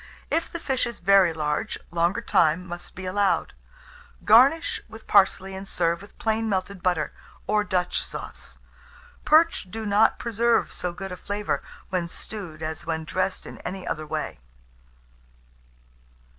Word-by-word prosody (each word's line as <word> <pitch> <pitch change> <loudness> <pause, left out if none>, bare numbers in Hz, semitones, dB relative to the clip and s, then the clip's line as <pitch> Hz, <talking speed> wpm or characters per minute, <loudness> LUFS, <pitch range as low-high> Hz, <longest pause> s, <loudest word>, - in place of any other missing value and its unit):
If 335 - 0
the 340 - -4
fish 265 -5 0
is 235 - -7
very 195 -1 +5
large, 150 -2 -2
longer 170 +6 +1
time 170 -5 +3
must 175 0 -8
be 185 - -7
allowed. 195 +1 +1 0.7
Garnish 265 +10 +5
with 220 0 -12
parsley, 195 -1 +3
and 190 +1 -7
serve 170 -1 0
with 200 - -15
plain 220 0 0
melted 190 -1 -2
butter, 175 -4 0 0.3
or 210 0 +2
Dutch 180 -3 0
sauce. - - -9 0.7
Perch 315 - +4
do 220 +3 -5
not 210 +2 +4
preserve 235 0 +1
so 180 - -3
good 190 +2 -7
a 180 - -5
flavour 205 +2 -2 0.3
when 180 -3 -1
stewed 170 -4 -8
as 155 0 -4
when 160 -1 -3
dressed 185 +3 -2
in - - -9
any 190 0 -6
other 155 -1 -3
way. 65 - -4
190 Hz, 145 wpm, -25 LUFS, 175-220 Hz, 0.7 s, very